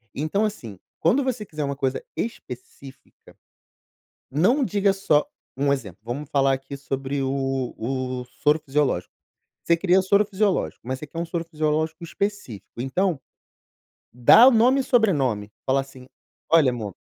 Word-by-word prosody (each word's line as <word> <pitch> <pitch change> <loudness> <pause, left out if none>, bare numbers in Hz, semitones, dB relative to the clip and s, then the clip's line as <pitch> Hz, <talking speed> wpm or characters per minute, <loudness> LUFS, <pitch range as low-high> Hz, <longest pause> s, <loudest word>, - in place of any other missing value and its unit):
então 155 +9 0
assim, 115 - -6 0.2
quando 245 - +3
você 245 -5 -2
quiser 155 -5 -5
uma 140 0 -2
coisa 135 -1 -2
específica, 135 - -9 1.0
não 200 - +3
diga 200 -3 +2
só 155 -6 +2 0.3
um 140 +1 +1
exemplo, 105 -10 -6
vamos 130 +6 -5
falar 135 -2 +2
aqui 135 +1 -5
sobre 135 0 -3
o 135 -1 -2
o 130 +1 -3 0.2
soro 150 +1 +3
fisiológico. 135 -11 -1 0.5
Você 170 - +4
queria 185 +2 +3
soro 200 +2 +3
fisiológico, 195 - -1
mas 130 +1 -3
você 150 - -8
quer 165 +3 -4
soro 170 0 -3
fisiológico 155 +1 -1
específico, 170 - -5
então. 170 +4 0 1.0
Dá 225 - +8
o - - +7
nome 250 +4 +4
e - - 0
sobrenome. 140 - +1
Fala 135 +1 +2
assim: 130 -2 -13 0.4
"Olha 160 -6 +5
amor, 110 -6 -6
145 Hz, 145 wpm, -24 LUFS, 130-190 Hz, 1.0 s, Dá